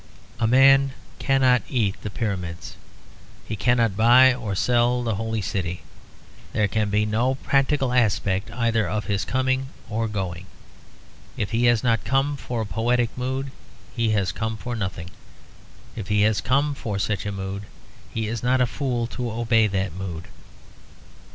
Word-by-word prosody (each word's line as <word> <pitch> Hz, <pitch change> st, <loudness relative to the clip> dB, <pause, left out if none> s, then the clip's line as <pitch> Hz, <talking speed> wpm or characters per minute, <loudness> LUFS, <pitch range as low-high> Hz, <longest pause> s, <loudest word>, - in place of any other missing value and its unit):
A 115 Hz, -, +2 dB
man 135 Hz, +2 st, +5 dB, 0.3 s
cannot 130 Hz, -2 st, +3 dB
eat 105 Hz, -7 st, 0 dB
the 105 Hz, -, -4 dB
Pyramids; 90 Hz, -6 st, -4 dB, 0.7 s
he 110 Hz, -, -3 dB
cannot 115 Hz, -1 st, +2 dB
buy 125 Hz, +4 st, +6 dB
or 115 Hz, -6 st, -4 dB
sell 120 Hz, +3 st, +2 dB
the 115 Hz, -2 st, -1 dB
Holy 110 Hz, 0 st, -2 dB
City; 90 Hz, -2 st, -3 dB, 0.7 s
there 105 Hz, -1 st, +2 dB
can 105 Hz, +1 st, 0 dB
be 105 Hz, +1 st, +2 dB
no 120 Hz, +5 st, +1 dB
practical 135 Hz, -1 st, +1 dB
aspect 100 Hz, -5 st, +1 dB
either 115 Hz, -2 st, 0 dB
of 105 Hz, 0 st, -2 dB
his 100 Hz, -1 st, -1 dB
coming 130 Hz, +1 st, 0 dB, 0.2 s
or 115 Hz, +1 st, 0 dB
going. 95 Hz, -4 st, -4 dB, 0.9 s
If 105 Hz, -, -2 dB
he 115 Hz, +1 st, +2 dB
has 120 Hz, -2 st, +3 dB
not 115 Hz, -5 st, +2 dB
come 135 Hz, +4 st, +1 dB
for 120 Hz, -4 st, -4 dB
a -, -, -2 dB
poetic 120 Hz, +2 st, 0 dB
mood 130 Hz, +2 st, -3 dB, 0.4 s
he 115 Hz, -2 st, +1 dB
has 100 Hz, -5 st, +1 dB
come 110 Hz, +4 st, -3 dB
for 120 Hz, +3 st, -5 dB
nothing; 95 Hz, -5 st, -4 dB, 0.8 s
if 110 Hz, -4 st, -6 dB
he 105 Hz, -1 st, +2 dB
has 110 Hz, -1 st, +2 dB
come 140 Hz, +4 st, +1 dB
for 110 Hz, -7 st, -4 dB
such 105 Hz, +1 st, -2 dB
a -, -, -2 dB
mood, 100 Hz, 0 st, -5 dB, 0.4 s
he 110 Hz, -1 st, -2 dB
is 115 Hz, 0 st, -3 dB
not 125 Hz, +1 st, +2 dB
a 125 Hz, -, +4 dB
fool 125 Hz, -1 st, -2 dB
to 120 Hz, 0 st, -4 dB
obey 115 Hz, -1 st, +2 dB
that 95 Hz, -3 st, -2 dB
mood. 90 Hz, -3 st, -6 dB
115 Hz, 160 wpm, -24 LUFS, 100-125 Hz, 0.9 s, buy